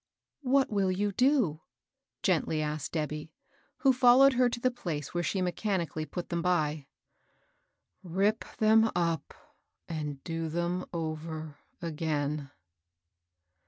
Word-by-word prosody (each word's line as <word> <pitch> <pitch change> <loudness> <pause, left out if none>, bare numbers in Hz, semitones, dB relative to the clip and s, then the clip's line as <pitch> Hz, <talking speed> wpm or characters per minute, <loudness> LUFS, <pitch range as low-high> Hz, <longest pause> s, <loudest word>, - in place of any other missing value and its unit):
"What 270 -1 +2
win 195 -3 +2
you 205 +2 0
do?" 240 - +2 0.6
gently 155 - +1
asked 150 -1 -3
Debby, 150 -1 -3 0.5
who 270 -2 +5
followed 255 +2 +6
her 250 0 +3
to 240 - -4
the 255 +1 +2
place 160 - -5
where 175 - 0
she 185 +2 -1
mechani 180 -1 -1
cally 155 0 -5
put 175 +4 -5
them 170 -1 -1
by. 155 -5 0 0.6
" - - -46 0.2
Rip 195 +5 +1
them 220 +1 +5
up, 165 -4 -1 0.5
and 150 -4 -5
do 165 -1 -3
them 175 +3 -2
over 160 -2 -5 0.2
again." 150 -3 -2
170 Hz, 125 wpm, -30 LUFS, 155-210 Hz, 0.6 s, followed